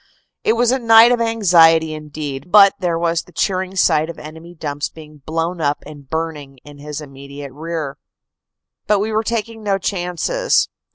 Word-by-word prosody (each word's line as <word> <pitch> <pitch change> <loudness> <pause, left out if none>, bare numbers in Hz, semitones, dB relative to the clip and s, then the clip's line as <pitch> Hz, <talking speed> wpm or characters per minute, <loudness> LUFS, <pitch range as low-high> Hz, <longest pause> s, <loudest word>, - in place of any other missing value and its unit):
It 220 - +3
was 240 +1 +2
a 260 - +1
night 230 0 +7
of 240 -1 +1
anxiety 170 -8 +4
indeed, 150 0 -7
but 200 -2 +7
there 175 -3 -1
was 170 0 0
the - - -20
cheering 190 0 -2
sight 160 -3 +2
of 170 - -8
enemy 160 +3 -11
dumps 145 -2 -4
being 150 -2 -14
blown 165 +2 -2
up 145 -1 -1
and 145 -3 -12
burning 155 -4 -4
in 145 -1 -14
his 150 +1 -7
immediate 140 -1 -10
rear. 155 -2 -5 0.9
But 210 -1 +3
we 210 +2 -1
were 220 +1 0
taking 225 0 -3
no 200 -2 0
chances. 195 - 0
165 Hz, 170 wpm, -19 LUFS, 150-205 Hz, 0.9 s, night